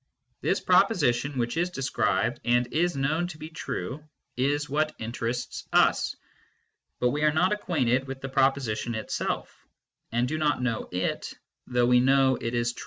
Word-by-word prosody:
This -, -, +1 dB
proposition, 120 Hz, +4 st, +2 dB
which 120 Hz, +3 st, -1 dB
is 175 Hz, +2 st, +1 dB
described 120 Hz, -, 0 dB
and 120 Hz, +1 st, +3 dB
is 175 Hz, +1 st, +1 dB
known 155 Hz, +6 st, 0 dB
to 170 Hz, -3 st, -9 dB
be 155 Hz, 0 st, -8 dB
true, 145 Hz, -2 st, -5 dB, 0.3 s
is 145 Hz, +3 st, 0 dB
what 155 Hz, +2 st, 0 dB
interests 115 Hz, +2 st, -4 dB
us; -, -, +3 dB, 0.4 s
| -, -, -49 dB
but 125 Hz, -, +3 dB
we 150 Hz, -, -2 dB
are 150 Hz, -, +5 dB
not 175 Hz, +5 st, +2 dB
acquainted 135 Hz, -, 0 dB
with 135 Hz, 0 st, -6 dB
the 135 Hz, -, -5 dB
proposition 130 Hz, -4 st, +1 dB
itself, 110 Hz, -, -3 dB, 0.6 s
and 120 Hz, +2 st, +1 dB
do 155 Hz, +4 st, -2 dB
not 150 Hz, -2 st, +1 dB
know 125 Hz, -3 st, -2 dB
it, 90 Hz, +1 st, -2 dB, 0.3 s
though 125 Hz, -1 st, +2 dB
we 125 Hz, 0 st, +5 dB
know 135 Hz, +1 st, +4 dB
it 115 Hz, 0 st, -3 dB
is 120 Hz, 0 st, 0 dB
true. -, -, -12 dB
130 Hz, 170 wpm, -27 LUFS, 120-150 Hz, 0.6 s, are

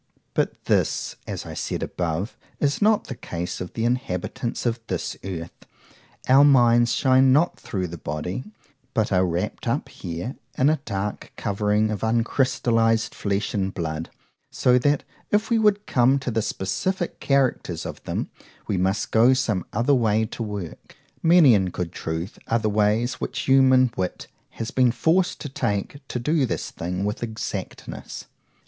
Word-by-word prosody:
But -, -, -1 dB
this, -, -, +1 dB
as -, -, -5 dB
I -, -, -7 dB
said -, -, -3 dB
above, 90 Hz, +4 st, -3 dB, 0.2 s
is 145 Hz, +5 st, +1 dB
not 215 Hz, 0 st, +4 dB
the -, -, -6 dB
case 90 Hz, -7 st, -5 dB
of 90 Hz, -, -6 dB
the 115 Hz, -, -1 dB
inhabitants 120 Hz, -1 st, -2 dB
of 120 Hz, 0 st, 0 dB
this -, -, -3 dB
earth;—our 95 Hz, +8 st, -1 dB
minds 120 Hz, -4 st, +5 dB
shine 130 Hz, 0 st, +4 dB
not 150 Hz, +6 st, +3 dB
through 95 Hz, -4 st, -3 dB
the 85 Hz, -1 st, -7 dB
body, 75 Hz, -, -4 dB, 0.5 s
but 110 Hz, -3 st, +1 dB
are 95 Hz, -1 st, +4 dB
wrapt 85 Hz, 0 st, -2 dB
up -, -, -1 dB
here 85 Hz, +9 st, -6 dB, 0.2 s
in 135 Hz, +4 st, +4 dB
a 155 Hz, -, -1 dB
dark 100 Hz, 0 st, -4 dB
covering 105 Hz, +1 st, +1 dB
of 105 Hz, -, -3 dB
uncrystalized 115 Hz, -1 st, +1 dB
flesh 100 Hz, 0 st, -2 dB
and 95 Hz, -2 st, -1 dB
blood; 80 Hz, -2 st, -3 dB, 0.4 s
so 125 Hz, 0 st, +3 dB
that, 145 Hz, +3 st, +2 dB, 0.3 s
if 210 Hz, +3 st, +1 dB
we 230 Hz, -, +4 dB
would 210 Hz, -1 st, +3 dB
come 130 Hz, +2 st, +3 dB
to 130 Hz, -2 st, -3 dB
the 110 Hz, -, +1 dB
specific 175 Hz, -, -2 dB
characters 135 Hz, -2 st, 0 dB
of -, -, -7 dB
them, -, -, -3 dB, 0.3 s
we 100 Hz, -, -1 dB
must 95 Hz, +3 st, 0 dB
go 120 Hz, +4 st, +5 dB
some 110 Hz, -8 st, 0 dB
other 125 Hz, +5 st, +2 dB
way 110 Hz, -3 st, +2 dB
to 115 Hz, -, -7 dB
work. 105 Hz, -6 st, -6 dB, 0.3 s
Many, 165 Hz, -6 st, +7 dB
in 95 Hz, -3 st, +2 dB
good 90 Hz, -1 st, -4 dB
truth, 80 Hz, +4 st, -5 dB
are 115 Hz, -, +2 dB
the 110 Hz, -2 st, 0 dB
ways, 110 Hz, +4 st, +1 dB
which -, -, -3 dB
human 130 Hz, -2 st, +5 dB
wit 90 Hz, -1 st, -3 dB, 0.2 s
has 115 Hz, 0 st, -5 dB
been 125 Hz, -2 st, +4 dB
forced 175 Hz, +8 st, +1 dB
to 145 Hz, -, -5 dB
take, 120 Hz, +2 st, -2 dB
to -, -, -3 dB
do 140 Hz, +3 st, +1 dB
this -, -, -3 dB
thing 90 Hz, +3 st, -3 dB
with 105 Hz, +1 st, -3 dB
exactness. 110 Hz, -2 st, -6 dB
115 Hz, 160 wpm, -24 LUFS, 95-130 Hz, 0.5 s, Many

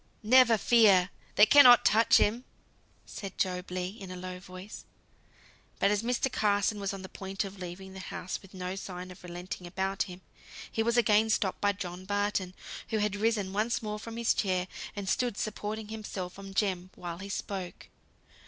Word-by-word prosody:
"Never 235 Hz, 0 st, +6 dB
fear! 200 Hz, -6 st, +5 dB, 0.2 s
They 210 Hz, -, +8 dB
cannot 245 Hz, 0 st, +8 dB
touch 225 Hz, +2 st, +5 dB
him," 230 Hz, +4 st, +2 dB, 0.6 s
said 195 Hz, -3 st, -8 dB
Job 180 Hz, -1 st, -1 dB
Legh, 180 Hz, +3 st, -4 dB
in 190 Hz, -, -7 dB
a 185 Hz, -, -6 dB
low 180 Hz, 0 st, -6 dB
voice. 185 Hz, +2 st, -10 dB, 0.9 s
But 200 Hz, -, +3 dB
as 210 Hz, -1 st, +1 dB
Mr. 245 Hz, +2 st, 0 dB
Carson 205 Hz, 0 st, +1 dB
was 200 Hz, -1 st, -2 dB
on 195 Hz, -1 st, -7 dB
the -, -, -6 dB
point 195 Hz, +1 st, -4 dB
of 195 Hz, -1 st, -8 dB
leaving 185 Hz, +1 st, -8 dB
the 190 Hz, -, -8 dB
house 185 Hz, 0 st, -5 dB
with 195 Hz, 0 st, -16 dB
no 185 Hz, 0 st, -4 dB
sign 185 Hz, -1 st, -7 dB
of 180 Hz, -, -14 dB
relenting 180 Hz, 0 st, -7 dB
about 190 Hz, +2 st, -2 dB
him, 180 Hz, +1 st, -10 dB, 0.5 s
he 225 Hz, -, 0 dB
was 235 Hz, +1 st, +1 dB
again 220 Hz, -1 st, +4 dB
stopped 195 Hz, -3 st, 0 dB
by 205 Hz, 0 st, +3 dB
John 185 Hz, -2 st, -7 dB
Barton, 205 Hz, -2 st, -1 dB, 0.3 s
who 220 Hz, -, -1 dB
had 210 Hz, -1 st, 0 dB
risen 205 Hz, -2 st, 0 dB
once 225 Hz, +4 st, 0 dB
more 210 Hz, 0 st, -4 dB
from 230 Hz, +1 st, -8 dB
his 235 Hz, -1 st, +2 dB
chair, 185 Hz, -3 st, 0 dB, 0.3 s
and 200 Hz, -2 st, -5 dB
stood 245 Hz, 0 st, 0 dB
supporting 215 Hz, 0 st, -4 dB
himself 200 Hz, -4 st, -6 dB
on 195 Hz, -1 st, -9 dB
Jem, 185 Hz, -3 st, 0 dB
while 170 Hz, -1 st, -6 dB
he 195 Hz, +1 st, -7 dB
spoke. 195 Hz, -2 st, -5 dB
200 Hz, 180 wpm, -30 LUFS, 185-215 Hz, 0.9 s, They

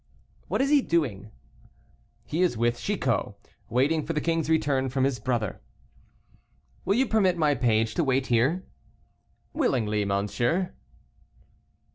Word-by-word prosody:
"What -, -, 0 dB
is 275 Hz, -, 0 dB
he 290 Hz, -2 st, +5 dB
doing?" 125 Hz, -, -1 dB, 1.0 s
"He 160 Hz, +4 st, -2 dB
is 180 Hz, -10 st, +2 dB
with 120 Hz, +1 st, 0 dB
Chicot, -, -, -1 dB, 0.3 s
waiting 145 Hz, +6 st, +1 dB
for 160 Hz, +3 st, -3 dB
the 150 Hz, -, 0 dB
king's 165 Hz, -1 st, -1 dB
return 140 Hz, -4 st, +1 dB
from 130 Hz, +1 st, 0 dB
his 135 Hz, -2 st, 0 dB
brother." 115 Hz, -, -2 dB, 1.2 s
"Will 195 Hz, -, +2 dB
you 260 Hz, +3 st, +3 dB
permit 195 Hz, -7 st, +2 dB
my 150 Hz, -3 st, +3 dB
page 115 Hz, -3 st, +1 dB
to 170 Hz, -, 0 dB
wait 135 Hz, -1 st, +1 dB
here?" 130 Hz, +10 st, +1 dB, 0.9 s
"Willingly, 105 Hz, -4 st, 0 dB
monsieur." 105 Hz, -, -1 dB
135 Hz, 130 wpm, -26 LUFS, 120-165 Hz, 1.2 s, he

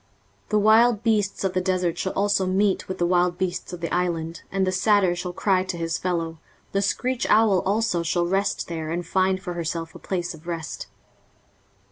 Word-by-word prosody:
23:034:014 -, -, -35 dB
The 215 Hz, -, +2 dB
wild 220 Hz, +1 st, +5 dB
beasts 210 Hz, -4 st, +1 dB
of 190 Hz, -1 st, 0 dB
the 185 Hz, -, +1 dB
desert 180 Hz, -2 st, 0 dB
shall 190 Hz, -, -3 dB
also 200 Hz, -1 st, +1 dB
meet 195 Hz, +1 st, +1 dB
with 185 Hz, -, -4 dB
the 175 Hz, -, +1 dB
wild 175 Hz, 0 st, +2 dB
beasts 185 Hz, -1 st, -3 dB
of 175 Hz, -1 st, -7 dB
the 170 Hz, -, -3 dB
island, 170 Hz, -2 st, -1 dB
and 195 Hz, -1 st, +1 dB
the 185 Hz, -, +1 dB
satyr 190 Hz, -1 st, +3 dB
shall 175 Hz, +1 st, -4 dB
cry 185 Hz, 0 st, +1 dB
to 185 Hz, -2 st, -4 dB
his 165 Hz, -1 st, -2 dB
fellow; 165 Hz, -3 st, -2 dB, 0.3 s
the 195 Hz, -, +1 dB
screech 250 Hz, +5 st, -1 dB
owl 210 Hz, -3 st, +5 dB
also 205 Hz, -4 st, +1 dB
shall 175 Hz, +1 st, 0 dB
rest 195 Hz, +3 st, 0 dB
there, 160 Hz, -2 st, -4 dB
and 170 Hz, +1 st, -3 dB
find 190 Hz, 0 st, +1 dB
for 180 Hz, -, -4 dB
herself 165 Hz, -1 st, -4 dB
a -, -, -11 dB
place 175 Hz, -2 st, -3 dB
of 160 Hz, +1 st, -14 dB
rest. 165 Hz, -3 st, -5 dB
185 Hz, 200 wpm, -24 LUFS, 175-195 Hz, 0.3 s, wild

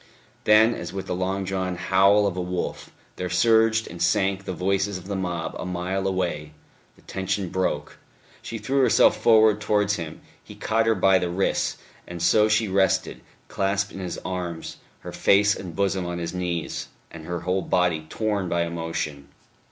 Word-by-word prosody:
Then, 110 Hz, +2 st, +6 dB
as 85 Hz, -5 st, -6 dB
with 95 Hz, 0 st, -6 dB
a -, -, +1 dB
long 95 Hz, +2 st, -2 dB
drawn 95 Hz, -1 st, -2 dB
howl 95 Hz, +3 st, +4 dB
of 100 Hz, -3 st, -1 dB
a 90 Hz, -, -2 dB
wolf, 90 Hz, 0 st, -4 dB, 0.3 s
there 90 Hz, 0 st, -3 dB
surged 110 Hz, +4 st, +3 dB
and 85 Hz, 0 st, -9 dB
sank 95 Hz, +1 st, +1 dB
the -, -, -3 dB
voices 95 Hz, +2 st, -1 dB
of 90 Hz, -, -11 dB
the 100 Hz, 0 st, -4 dB
mob 90 Hz, -3 st, -3 dB
a -, -, -4 dB
mile 90 Hz, +2 st, -2 dB
away, 85 Hz, -5 st, -2 dB, 0.4 s
the -, -, -23 dB
tension 95 Hz, 0 st, -3 dB
broke.... 95 Hz, 0 st, -2 dB, 0.4 s
She 115 Hz, -, -6 dB
threw 135 Hz, +5 st, -1 dB
herself 130 Hz, -, +5 dB
forward 110 Hz, -2 st, +4 dB
towards 105 Hz, -1 st, +1 dB
him, 80 Hz, -3 st, -7 dB, 0.2 s
he -, -, -12 dB
caught 115 Hz, 0 st, 0 dB
her 115 Hz, -, +3 dB
by 95 Hz, 0 st, +4 dB
the 90 Hz, -, -2 dB
wrists, 95 Hz, +3 st, 0 dB, 0.3 s
and 85 Hz, 0 st, -7 dB
so 105 Hz, +5 st, +4 dB
she 105 Hz, +1 st, +2 dB
rested, 95 Hz, 0 st, +1 dB, 0.3 s
clasped 100 Hz, -1 st, -1 dB
in -, -, -8 dB
his 90 Hz, -2 st, -4 dB
arms, 90 Hz, -3 st, -5 dB, 0.2 s
her -, -, -8 dB
face 105 Hz, +1 st, +3 dB
and 90 Hz, -4 st, -8 dB
bosom 95 Hz, -2 st, 0 dB
on 85 Hz, 0 st, -4 dB
his 85 Hz, 0 st, -4 dB
knees, 90 Hz, -2 st, -3 dB, 0.2 s
and 80 Hz, -1 st, -10 dB
her 85 Hz, 0 st, -4 dB
whole 90 Hz, +2 st, 0 dB
body 85 Hz, -5 st, 0 dB
torn 105 Hz, -4 st, -1 dB
by 85 Hz, 0 st, +1 dB
emotion. 80 Hz, -4 st, -4 dB
95 Hz, 180 wpm, -24 LUFS, 90-100 Hz, 0.4 s, Then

